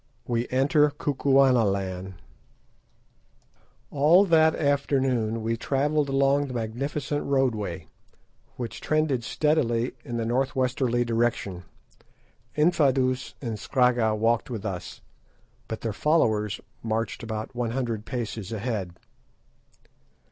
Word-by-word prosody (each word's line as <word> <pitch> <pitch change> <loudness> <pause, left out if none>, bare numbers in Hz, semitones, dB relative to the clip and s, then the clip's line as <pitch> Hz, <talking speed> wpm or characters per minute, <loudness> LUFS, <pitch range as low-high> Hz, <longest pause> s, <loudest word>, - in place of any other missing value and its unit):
WE 120 0 -1
ENTER 145 +3 +3
KUKUANALAND 120 -10 +1 1.8
All 160 +8 +5
that 160 -3 +4
afternoon 130 -6 0
we 115 +1 0
travelled 145 +4 0
along 140 +1 +2
the 130 - -6
magnificent 135 +6 -3
roadway, 120 -10 -1 0.7
which 120 -5 -6
trended 155 -5 +1
steadily 125 -5 +1
in 120 -3 -4
a 115 - -1
north 130 +3 0
westerly 125 -2 +1
direction. 115 -6 -1 0.9
Infadoos 135 -5 +2
and 115 -3 -3
Scragga 120 -2 +2
walked 115 +3 +1
with 110 -4 -5
us, 95 -3 -5 0.7
but 110 - -5
their 115 -2 -2
followers 110 -8 +1 0.2
marched 115 0 -2
about 110 -1 -5
one 120 -1 -2
hundred 115 -3 -2
paces 115 -4 -5
ahead. 105 -6 -3
120 Hz, 105 wpm, -26 LUFS, 110-140 Hz, 1.8 s, All